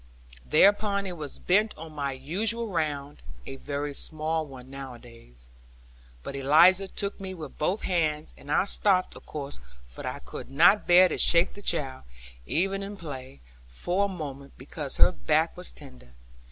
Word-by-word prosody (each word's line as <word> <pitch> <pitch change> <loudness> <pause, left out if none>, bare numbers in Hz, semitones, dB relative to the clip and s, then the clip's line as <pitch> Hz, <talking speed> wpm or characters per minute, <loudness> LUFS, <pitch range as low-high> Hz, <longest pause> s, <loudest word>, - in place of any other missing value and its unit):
Thereupon 200 - +3
I 190 - -4
was 155 -5 -6
bent 210 +4 +1
on 160 0 -9
my 140 -2 -3
usual 210 - -1
round 145 -5 -3 0.2
(a 135 - -7
very 145 +1 -4
small 155 +2 -1
one 130 -2 -12
nowadays), 120 - -12 0.7
but 140 - -6
Eliza 170 +8 +5
took 200 +1 -3
me 190 -1 -6
with 155 -5 -10
both 180 +7 0
hands, 155 -4 -1
and 145 - -10
I 165 - +3
stopped 195 -2 +2
of - - -14
course; 145 -2 -7 0.3
for - - -9
I - - -4
could - - -9
not 175 +10 +4
bear 180 +1 +7
to 170 - -4
shake 170 0 +5
the 205 - -11
child, 140 -9 +1 0.5
even 195 +4 0
in 200 +1 -7
play, 130 - -9 0.3
for 175 - -1
a - - 0
moment, 140 -7 -7
because 140 +1 -5
her - - +6
back 160 -1 0
was 180 0 -5
tender. 125 - -13
155 Hz, 165 wpm, -27 LUFS, 140-185 Hz, 0.7 s, bear